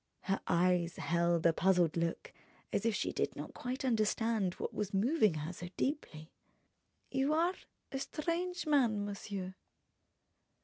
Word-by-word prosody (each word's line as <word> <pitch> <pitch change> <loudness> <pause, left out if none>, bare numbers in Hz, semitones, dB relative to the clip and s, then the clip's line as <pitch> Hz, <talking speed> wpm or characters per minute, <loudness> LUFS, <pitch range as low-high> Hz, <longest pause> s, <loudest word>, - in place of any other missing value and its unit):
Her 195 -1 -1
eyes 175 -1 +2
held 170 0 +1
a 170 - +6
puzzled 175 -2 +3
look, 170 - -2 0.4
as 230 - +1
if 225 - +1
she - - -1
did - - -1
not - - -7
quite 255 +2 -4
understand 220 -4 +1
what - - -4
was 205 -1 -2
moving 215 - +3
her 155 +3 -4
so 175 0 -7
deeply. 170 - -3 0.8
"You 275 +3 +2
are 340 +3 +3 0.4
a 270 - -2
strange 345 +5 -2
man, 240 -9 +3
monsieur...." 200 -2 -5
205 Hz, 140 wpm, -34 LUFS, 175-270 Hz, 0.8 s, a